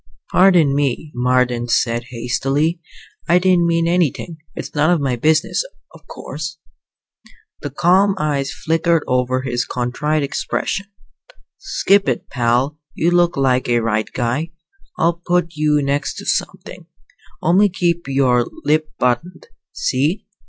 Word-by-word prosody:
"Pardon 180 -6 +5
me," 145 +1 -1
Marden 125 -1 +1
said 120 0 0
hastily. 135 +7 -1 0.5
"I 175 - +6
didn't 180 -2 +3
mean 165 0 +1
anything. 170 -1 0 0.2
It's - - -7
none 150 +2 +2
of 175 -2 +3
my 135 -3 0
business, 155 - +1 0.3
of - - -17
course." 155 +3 -7 1.0
The 145 - -4
calm 185 +7 +3
eyes 140 -4 -1
flicked 165 +1 -2 0.2
over 125 0 0
his 125 -2 -1
contrite 135 +5 -1
expression. 195 +7 -3 0.7
"Skip 200 0 +2
it, - - -3
pal. 125 +3 0 0.2
You 170 +2 +1
look 175 -2 +2
like 130 -2 +1
a 120 0 +3
right 110 -1 -1
guy. 125 +7 -2 0.5
I'll 170 +1 +1
put 175 -1 0
you 150 -2 +1
next 140 +1 -1
to - - -8
somethin'. - - -3 0.6
Only 190 +5 +4
keep 170 -3 -1
your 130 -3 +2 0.2
lip 155 +1 +1
buttoned, 125 - -1 0.2
see?" 145 +9 -1
150 Hz, 130 wpm, -19 LUFS, 125-170 Hz, 1.0 s, I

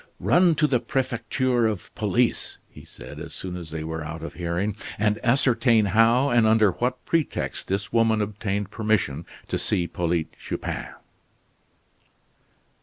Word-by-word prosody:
"Run 160 - +4
to 155 0 +3
the 130 -5 +2
Prefecture 120 -1 0
of 105 -4 -5
Police," 115 +3 0
he - - -14
said 70 +5 -11
as 80 0 -8
soon 90 -1 -5
as 85 -3 -7
they 80 0 -5
were 80 0 -4
out 80 +1 -7
of 85 - -6
hearing, 85 +4 -2 0.2
"and 105 0 0
ascertain 120 -3 +3
how 115 +5 +4
and 115 -2 +4
under 110 -2 +4
what 125 +6 -3
pretext 165 -3 -1
this 100 +2 -3
woman 115 -1 +3
obtained 105 -1 -2
permission 100 -9 0 0.2
to - - -2
see 90 - 0
Polyte 85 -2 -2
Chupin." - - -4
110 Hz, 145 wpm, -25 LUFS, 85-120 Hz, 0.2 s, Run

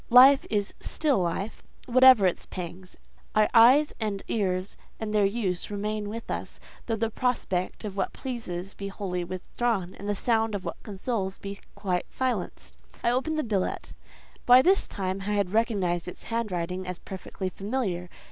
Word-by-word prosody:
Life 265 +3 +8
is 205 -2 0
still 290 -8 +1
life, 185 +4 -2 0.2
whatever 255 -4 +7
its 180 - 0
pangs: 180 0 -7 0.4
our 215 0 +5
eyes 255 +6 +7
and 210 -3 -2
ears 185 -3 -1 0.2
and 215 -1 -3
their 205 -2 +4
use 195 -4 -2
remain 210 0 -3
with 230 +2 -6
us, - - -5 0.3
though 225 - +1
the 225 +1 -1
prospect 215 -6 -1
of 200 -1 -6
what 190 - 0
pleases 195 -8 -5
be 200 - -6
wholly 190 -3 -3
withdrawn, 185 +2 -2
and 200 +1 -7
the 205 - +1
sound 225 0 +1
of 195 - -5
what - - -5
consoles 195 -2 -3
be 200 0 -7 0.2
quite 190 -3 -2
silenced. 250 -8 -3 0.3
I 235 - +3
opened 290 +6 0
the 310 - +1
billet: 205 -5 -2 0.5
by 250 +1 +8
this 385 +3 +4
time 190 -1 -3
I 205 +2 -2
had 200 -2 0
recognised 195 -7 +1
its 180 - -6
handwriting 185 -5 -2
as 180 -1 -4
perfectly 190 0 -6
familiar. 195 -3 -3
205 Hz, 165 wpm, -27 LUFS, 185-230 Hz, 0.5 s, Life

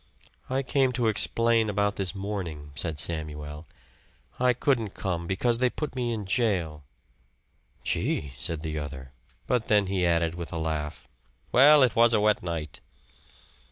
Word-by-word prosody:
"I 135 +1 0
came 135 0 +2
to 125 -2 0
explain 115 +1 +3
about 100 0 0
this 95 0 -3
morning," 90 -7 -5
said 80 +2 -3
Samuel. 75 -1 -4 0.7
"I 125 0 +4
couldn't 115 -6 0
come 85 -3 -3
because 115 +6 +1
they 125 0 +3
put 150 +2 -5
me 120 -2 -1
in 110 -3 -3
jail." 95 - 0 1.0
"Gee!" 70 -3 -1
said 80 +3 -5
the 80 -1 -3
other; 65 -3 -7 0.3
but 125 -3 0
then 105 -2 +3
he 95 -1 -1
added, 85 -1 +2
with 85 -1 -7
a - - -4
laugh, 80 -1 -4 0.4
"Well, 145 +3 +7
it 125 - +2
was 115 0 +5
a - - +3
wet 105 0 +2
night." 85 -3 -5
95 Hz, 155 wpm, -27 LUFS, 80-115 Hz, 1.0 s, Well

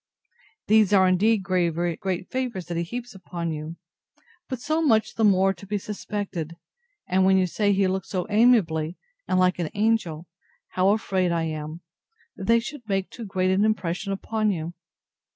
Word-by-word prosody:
These 215 -1 +4
are, 190 -2 +6
indeed, 200 +3 +3
very 175 -2 +1
great 185 0 -3
favours 250 -8 -3
that 170 -1 -4
he - - +1
heaps 240 +7 -6
upon 175 -3 -5
you, 155 +1 -5 0.7
but 260 -3 -3
so 310 +6 0
much 225 -9 +2
the 225 - -1
more 195 -2 +4
to 195 +2 -13
be 205 +1 -1
suspected; 200 -5 -5 0.5
and 185 +1 +2
when 190 0 +5
you 185 - +3
say 205 +3 +1
he 195 0 +3
looked 190 0 -2
so 185 -3 -2
amiably, 200 -8 +3 0.3
and - - +1
like 185 0 +3
an 165 -3 -1
angel, 200 -7 0 0.4
how 185 +1 +2
afraid 190 -4 +1
I 165 -1 0
am, 155 +1 -5 0.5
that 190 - -7
they 230 0 +5
should 240 -1 -8
make 195 -1 -1
too 235 - -8
great 185 -1 +1
an 190 +2 +3
impression 195 -3 -1
upon 215 +2 0
you! 170 -2 -4
190 Hz, 175 wpm, -25 LUFS, 175-215 Hz, 0.7 s, are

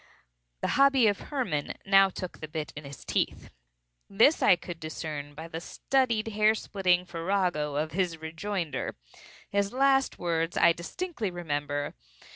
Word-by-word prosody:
The - - 0
hobby 275 -3 +6
of 205 -2 +2
Hermann 240 - -1
now 195 0 +6
took 185 -1 -7
the 155 - -6
bit 155 -1 -5
in 145 0 -8
his 140 -1 -10
teeth. - - -1 0.6
This 230 +10 +4
I - - +6
could 175 -1 -8
discern 150 -2 -6
by 160 +2 -7
the 165 0 -6
studied 235 +1 0
hair 215 +1 +3
splitting 180 -4 +1
farrago 170 -4 -1
of 155 +2 -1
his 175 -1 -1
rejoinder. 160 -2 -3 0.6
His 200 0 +1
last 270 +1 +3
words 165 -1 -1
I 170 - +6
distinctly 230 - -4
remember. 145 -4 -3
175 Hz, 145 wpm, -28 LUFS, 155-210 Hz, 0.6 s, hobby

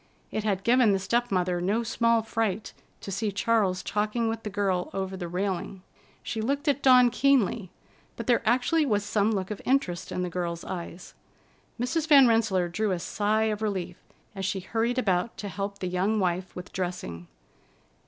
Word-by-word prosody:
It 215 - -2
had 195 -3 -1
given 235 -2 +4
the - - +2
step 240 +5 0
mother 180 -2 0
no 205 +6 +1
small 230 0 +2
fright 220 -2 -2 0.3
to 195 - -6
see 205 +2 -1
Charles 200 -3 +1
talking 215 +3 -1
with 225 0 -2
the 210 - -5
girl 195 -3 -1
over 190 0 -3
the 180 -2 -5
railing. 185 +1 -3 0.4
She 220 - -3
looked 280 +6 -1
at 285 -1 +2
Dawn 250 -2 +6
keenly, 240 -7 +2 0.5
but - - -6
there 240 -2 +3
actually 250 +8 +2
was 210 -7 0
some 205 0 +1
look 195 -2 -2
of 210 - -5
interest 250 -10 0
in 180 - -2
the - - -1
girl's 170 -1 -3
eyes. 175 0 -7 0.7
Mrs. 275 +6 -1
Van 280 -5 +8
Rensselaer 215 -6 +2
drew 215 +5 -1
a 185 - 0
sigh 210 +5 0
of 215 -1 -1
relief 185 -5 -3 0.4
as 195 -2 -6
she 190 0 -1
hurried 230 +5 -1
about 195 -3 0
to 205 - -5
help 200 +1 -4
the 185 - -4
young 190 +4 0
wife 180 -1 -1
with 180 0 -9
dressing. 175 - -4
205 Hz, 185 wpm, -27 LUFS, 185-230 Hz, 0.7 s, Van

